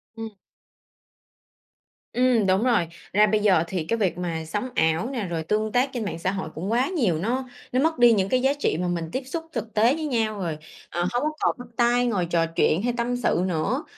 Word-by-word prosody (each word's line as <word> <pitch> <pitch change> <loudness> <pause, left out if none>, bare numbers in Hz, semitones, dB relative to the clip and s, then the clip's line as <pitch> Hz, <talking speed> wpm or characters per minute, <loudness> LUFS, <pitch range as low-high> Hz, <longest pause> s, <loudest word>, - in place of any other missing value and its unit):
Ừm. 225 0 -5 1.8
Ừm, 245 -4 +3
đúng 190 +3 +3
rồi. 230 -10 +2 0.3
Ra 210 +2 +5
bây 215 +1 +2
giờ 190 -6 +4
thì 175 -2 -2
cái 230 +9 -1
việc 185 -6 0
mà 165 -3 -3
sống 210 +9 -3
ảo 160 +9 +1
nè, 245 -6 -3
rồi 165 -2 -3
tương 215 +5 0
tác 250 +3 +2
trên 235 -4 -3
mạng 170 - -4
xã 185 +2 0
hội 190 -5 -4
cũng 185 +7 -3
quá 245 +3 +2
nhiều, 240 - +1
nó 250 +9 -2 0.2
nó 255 - +1
mất 320 +3 +2
đi 240 -1 +7
những 195 -2 +1
cái 255 +3 +2
giá 270 +2 +3
trị 155 - +1
mà 180 - -1
mình 170 -2 -2
tiếp 260 - -3
xúc 325 +4 -5
thực 220 -2 -4
tế 225 +4 +4
với 315 - -4
nhau. 225 -6 -1
Rồi, 165 -5 -3 0.3
ờ, 175 - -3
hông 245 +3 0
có 305 - +2
còn - - +1
bắt 245 -1 -10
tay, 240 +1 +3
ngồi 200 -7 0
trò 165 -1 +1
chuyện 165 +1 +1
hay 245 - 0
tâm 240 +1 0
sự 205 -7 +1
nữa 190 - -1
215 Hz, 230 wpm, -24 LUFS, 175-245 Hz, 1.8 s, đi